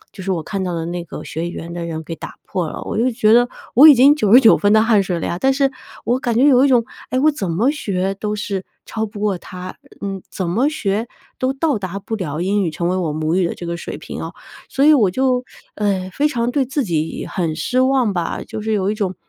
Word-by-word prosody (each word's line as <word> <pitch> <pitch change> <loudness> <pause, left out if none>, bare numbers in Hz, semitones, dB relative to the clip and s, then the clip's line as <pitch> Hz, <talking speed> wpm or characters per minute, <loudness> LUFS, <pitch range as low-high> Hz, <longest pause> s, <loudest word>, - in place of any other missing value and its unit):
就 195 - -8
是 195 - -1
我 170 - -2
看 195 +3 -4
到 180 -1 -2
的 165 -1 -3
那 175 0 -4
个 - - -8
学 165 +2 -4
语 - - -8
言 170 +1 -7
的 175 -1 -4
人 160 -1 -4
给 165 - -6
打 - - -9
破 180 -4 -2
了。 - - -7
我 - - -3
就 240 +3 +2
觉 220 -2 +2
得 245 +1 +5 0.3
我 270 +6 +8
已 295 - +10
经 270 +3 +6
99 225 +2 +6
分 205 - +2
的 215 - +6
汗 220 -3 +4
水 180 -2 -2
了 - - -3
呀， 175 - -2
但 270 - +3
是 275 0 +2 0.4
我 245 +2 +2
感 245 -2 -1
觉 250 - +4
有 265 -3 +6
一 - - +4
种， 245 -3 +4 0.3
哎， 255 - -1
我 305 +3 +4
怎 200 - -4
么 220 +11 +2
学 195 -9 -2
都 210 +1 -3
是 200 -2 -4 0.2
超 220 0 -3
不 210 -1 -9
过 205 -3 0
他， 180 +1 -9 0.3
嗯， 195 -1 -4
怎 185 -3 -3
么 240 +11 +2
学 220 -8 -1 0.3
都 255 +1 0
到 280 -1 0
达 195 -1 -5
不 220 +3 -4
了 155 -7 -4
英 195 +3 +1
语 170 - -1
成 170 +2 -2
为 185 - 0
我 175 -4 -1
母 155 +2 -1
语 185 -1 +2
的 - - -2
这 175 - -8
个 170 - -3
水 170 - -6
平 - - -7
哦。 - - -6 0.4
所 275 - +1
以 310 - +7
我 215 -10 +3
就， 255 +3 +1 0.3
呃， 195 -3 -1
非 295 +6 +1
常 235 -3 -1
对 270 +1 +1
自 270 +1 -2
己 160 -3 -2
很 170 -4 -1
失 245 +11 0
望 260 -5 +2
吧， 175 -2 -2
就 215 - -6
是 220 +1 -2
有 200 -2 +1
一 215 - -1
种 190 -4 -2
205 Hz, 280 characters per minute, -19 LUFS, 180-250 Hz, 0.4 s, 已